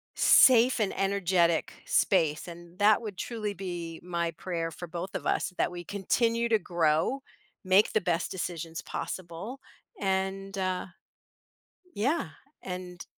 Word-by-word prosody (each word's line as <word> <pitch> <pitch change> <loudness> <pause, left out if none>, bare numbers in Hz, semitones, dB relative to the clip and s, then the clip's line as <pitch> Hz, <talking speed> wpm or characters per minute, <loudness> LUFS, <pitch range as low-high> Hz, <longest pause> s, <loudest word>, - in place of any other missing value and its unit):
safe 250 -1 +6
and 210 -3 +1
energetic 185 -4 +2
space 160 -4 +2
and 175 +1 -11
that 210 +1 +5
would 205 -4 -6
truly 215 -4 -3
be 175 -4 -6
my 170 -1 -1
prayer 165 -1 -4
for 175 - -8
both 175 +3 -6
of - - -4
us 185 - 0
that - - +2
we 175 0 -7
continue 230 +5 0
to 225 - +5
grow, 170 - +1 0.4
make 190 +2 +4
the 215 - +3
best 175 -1 -1
decisions 165 -3 -4
possible, 185 +9 -6 0.4
and 195 +1 -1
uh, 185 -1 -1 1.1
yeah, 275 +11 0 0.3
and 180 -1 -6
185 Hz, 130 wpm, -29 LUFS, 170-205 Hz, 1.1 s, safe